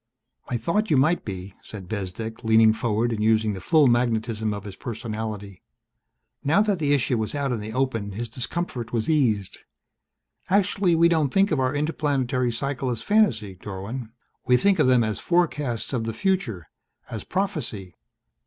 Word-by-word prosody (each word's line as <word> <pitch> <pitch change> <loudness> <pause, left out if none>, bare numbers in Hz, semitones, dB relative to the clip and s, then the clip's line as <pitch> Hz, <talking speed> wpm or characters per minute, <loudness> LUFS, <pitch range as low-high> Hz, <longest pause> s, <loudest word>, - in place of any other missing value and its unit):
"I 125 - 0
thought 205 - 0
you 150 - +4
might 155 +7 +3
be," 95 -1 -6
said 100 -4 -10
Bezdek, 110 +4 -5
leaning 110 0 +5
forward 115 +1 0
and 105 -2 -1
using 110 -1 +3
the 95 - -7
full 155 -3 +4
magnetism 115 -3 +1
of 105 -1 -5
his 100 -2 -8
personality. 110 -4 -6 0.8
Now 165 +9 +4
that 205 -4 0
the 145 -2 +1
issue 125 -3 +1
was 110 +5 -3
out 140 -2 -1
in 120 - -1
the 105 +1 -6
open 115 -6 -1
his 120 +4 -4
discomfort 125 0 -4
was 115 +5 0
eased. 110 - +1 0.9
"Actually 195 -2 +2
we 165 +1 +5
don't 160 -5 +2
think 195 0 +3
of 150 - +1
our 130 +2 0
interplanetary 140 -5 0
cycle 135 +2 -2
as 115 -2 -3
fantasy, 125 - +2
Dorwin. 100 +6 -6 0.4
We 125 - +5
think 195 +4 +2
of 150 - +4
them 125 -2 +5
as 110 -2 -2
forecasts 150 -10 0
of 115 -3 -1
the 115 - -3
future, 180 - -1 0.4
as 110 -3 -5
prophecy." 135 - -3
120 Hz, 170 wpm, -24 LUFS, 110-150 Hz, 0.9 s, leaning